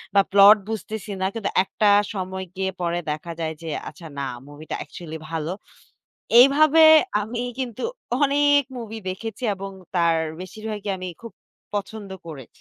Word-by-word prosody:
বা 200 - +8
প্লট 200 +2 +8
বুঝতেছি 220 -1 -5
না। - - +1
কিন্তু 225 -3 -2
একটা 210 +2 0 0.3
সময় 190 -1 -4
গিয়ে 190 0 -1
পরে 170 0 0
দেখা 155 +3 -5
যায় 160 -1 -2
যে 165 - -8 0.2
আচ্ছা 165 -3 -12
না - - -2 0.2
মুভিটা 145 +2 -7
অ্যাকচুয়ালি 160 -2 -8
ভালো। 160 +1 -2 0.9
এইভাবে 305 +4 +6 0.4
আমি 230 +3 -4 0.2
কিন্তু 255 -2 -4 0.4
অনেক 285 0 +4 0.2
মুভি 225 -1 -6
দেখেছি 220 +5 -6
এবং 195 0 -7 0.2
তার 170 -1 +3 0.2
বেশিরভাগই 210 +1 -5
আমি 185 0 -6
খুব 230 - -9 0.4
পছন্দ 205 0 -5 0.2
করেছি। 140 -6 -9
200 Hz, 145 wpm, -23 LUFS, 175-225 Hz, 0.9 s, বা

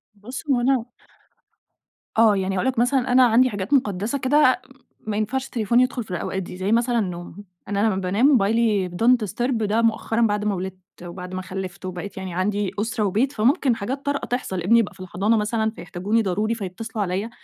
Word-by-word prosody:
بص 235 +6 -8
هو 255 -3 +3
أنا 255 -2 +2 1.3
آه، 220 -2 +6
يعني 190 0 -1
هاقول 190 +7 0
لك 260 -3 0
مثلًا 250 +1 +2
أنا 255 0 +6
عندي 245 +2 +4
حاجات 200 +3 -4
مقدسة 215 -1 +1
كده 260 -1 +3 0.5
ما 210 -1 -1
ينفعش 255 +5 -1
التليفون 235 -2 +1
يدخل 255 -1 +1
في 210 - -13
الأوقات 190 +2 -3
دي، 180 - -9
زي 190 +2 -1
مثلًا 235 +1 +2
النوم 180 0 -5 0.2
أنا 200 0 -1
لما 215 - +1
بانام 190 +6 +1
موبايلي 220 -6 +2
don't 230 +6 +3
disturb 245 +7 -2
ده 215 +2 +1
مؤخرًا 225 0 0
بعد 210 -2 +1
ما 205 - +1
ولِدت 190 0 -5 0.3
وبعد 180 +1 -8
ما 185 - -3
خَلِّفت 185 0 -6
وبقيت 185 +2 -6
يعني 190 -2 -5
عندي 200 +2 -1
أسرة 220 0 -1
وبيت 220 +8 +1
فممكن 250 +1 +2
حاجات 260 +7 -4
طارئة 285 0 -1
تحصل، 215 -7 -2
ابني 225 +7 +4
يبقى 225 - -1
في - - -21
الحضانة 195 +4 0
مثلًا 220 +1 0
فيحتاجوني 205 +2 -1
ضروري 215 +3 0
فيتصلوا 220 +2 -4
عليَّ 195 +4 -2
215 Hz, 190 wpm, -23 LUFS, 190-240 Hz, 1.3 s, آه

